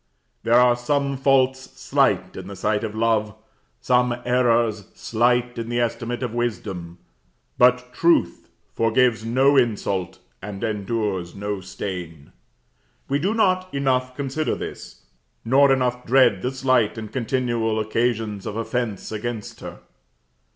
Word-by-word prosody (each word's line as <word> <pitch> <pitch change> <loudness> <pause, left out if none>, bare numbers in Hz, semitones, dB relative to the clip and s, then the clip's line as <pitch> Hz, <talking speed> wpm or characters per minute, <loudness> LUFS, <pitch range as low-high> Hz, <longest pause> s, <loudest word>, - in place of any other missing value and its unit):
There 120 +1 +4
are 125 -1 +5
some 140 +3 -1
faults 130 -1 +3 0.2
slight - - +1
in 95 0 -8
the 100 - -8
sight 105 +3 -1
of 110 -1 -4
love, 110 -2 +1 0.5
some 125 -1 +2
errors 120 -4 +2
slight 120 +1 0
in 115 0 -5
the 120 0 -1
estimate 120 +1 -2
of 120 -3 -3
wisdom; 95 -7 -4 0.6
but 125 0 +3
truth 165 - +1 0.2
forgives 115 0 +2
no 130 +5 +3
insult, 100 -7 0 0.2
and 100 +2 -7
endures 105 -4 -2
no 100 -1 -4
stain. 90 -5 -7 0.8
We 140 +1 +1
do 195 +8 0
not 185 -4 +1
enough 130 -2 0
consider 140 +3 -2
this; - - -8 0.4
nor 135 +4 +5
enough 125 -2 0
dread 120 -6 +4
the 125 - -1
slight 130 -4 +1
and 110 -1 -7
continual 120 -3 -1
occasions 110 -2 -1
of 105 - -4
offence 115 -2 -3
against 110 0 -5
her. - - -9
120 Hz, 130 wpm, -23 LUFS, 105-130 Hz, 0.8 s, are